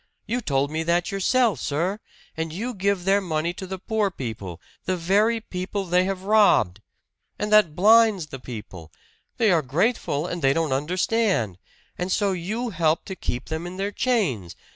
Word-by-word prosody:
You 240 +4 -2
told 140 - 0
me 160 +1 -1
that 170 +2 0
yourself, 200 - +2
sir! 175 +8 -1 0.4
And 160 0 -3
you 230 +9 -4
give 200 -2 0
their 195 +1 +3
money 170 -2 -1
to 190 +1 -7
the 190 +1 -5
poor 215 +1 0
people 110 - -6 0.3
the 185 -1 0
very 205 +7 +2
people 195 -1 -4
they 180 +1 +2
have 190 -1 -3
robbed! 200 - +4 0.6
And 210 0 -2
that 205 -8 +5
blinds 215 -2 +5
the 135 - -7
people 105 - -9 0.5
they 225 -4 +3
are 170 -3 +4
grateful, 150 - 0
and 175 -1 -4
they 135 -1 +4
don't 160 -3 0
understand! 170 - 0 0.4
And 180 +1 -2
so 200 0 +2
you 215 +7 -3
help 165 -3 +1
to 190 - -6
keep 125 -7 -4
them 160 +2 -3
in 180 +1 -8
their 200 +1 -2
chains! 180 - 0
180 Hz, 175 wpm, -24 LUFS, 155-205 Hz, 0.6 s, that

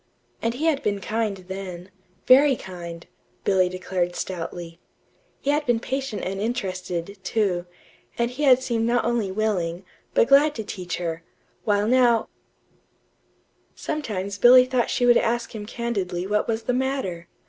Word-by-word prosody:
And 230 +1 -1
he 300 +6 -2
had 310 -4 +2
been 205 -1 -1
kind 215 0 -2
then 190 -1 -7 0.3
very 270 +2 +6
kind, 170 -4 -8 0.4
Billy 185 -2 +3
declared 180 -1 -2
stoutly. 170 -1 -5 0.6
He 280 - +1
had 300 +1 +1
been 240 -2 +3
patient 265 -2 -3
and 195 +1 -3
interested, 190 -4 -3
too, 185 -4 0 0.5
and 235 0 0
he 260 +4 -7
had 260 -3 +5
seemed 230 -3 0
not 240 0 +2
only 230 -5 0
willing, 190 -4 -1 0.3
but - - +5
glad 290 +2 +5
to 220 - -4
teach 180 -3 -5
her, 165 -2 -3 0.4
while 205 -1 +2
now 240 -2 +3 1.5
Sometimes 200 -10 -4
Billy 250 +3 +8
thought 255 -2 0
she 245 - +1
would 240 -1 +6
ask 235 0 0
him 210 -2 -6
candidly 195 -7 -3
what 210 +2 0
was 225 0 -1
the 250 - 0
matter. 250 -10 -2
215 Hz, 150 wpm, -24 LUFS, 185-245 Hz, 1.5 s, Billy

